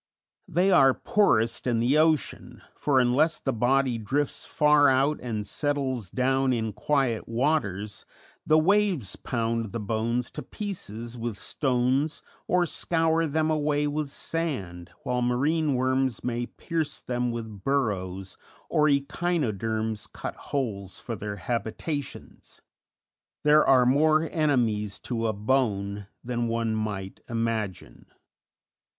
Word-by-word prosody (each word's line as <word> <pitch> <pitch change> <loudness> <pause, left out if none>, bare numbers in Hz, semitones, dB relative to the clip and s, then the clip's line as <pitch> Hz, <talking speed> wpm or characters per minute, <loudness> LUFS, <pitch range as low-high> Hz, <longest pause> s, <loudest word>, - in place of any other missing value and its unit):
They 180 +2 +2
are 135 -7 +6
poorest 115 - +2
in 120 -2 +2
the 130 +6 +3
ocean, 155 -2 0
for 140 -3 +2
unless 130 +6 +3
the 135 - -2
body 125 +1 +2
drifts 135 +7 -2
far 150 -1 +5
out 135 +3 +2
and 110 -4 -3
settles 130 - -2
down 130 +3 +1
in 110 -3 -1
quiet 120 +1 0
waters, 115 -6 -1 0.4
the 155 - +4
waves 180 - +2
pound 115 -3 -2
the 115 - -2
bones 115 +3 -1
to - - -6
pieces 120 - -6
with 115 -3 -3
stones 130 - 0 0.2
or 180 -1 +3
scour 165 0 +1
them 155 +1 +1
away 150 -1 +1
with 145 0 -2
sand, 105 - -4
while 125 0 -1
marine 140 +5 +1
worms 130 -1 0
may 120 0 -2
pierce 165 -3 -3
them 125 0 -2
with 110 -4 -6
burrows, 95 -8 -1 0.3
or 150 0 +3
echinoderms 115 - -1
cut - - -6
holes 100 -9 -4
for 115 - -5
their 105 0 -5
habitations; 120 - -5 0.8
there 150 +1 +6
are 130 -2 +6
more 155 +5 +4
enemies 120 - +1
to 115 -2 -2
a 110 - 0
bone 105 -3 0 0.2
than 120 -1 -1
one 115 -1 0
might 105 -3 -4
imagine. 115 -5 -3
125 Hz, 125 wpm, -27 LUFS, 110-150 Hz, 0.8 s, are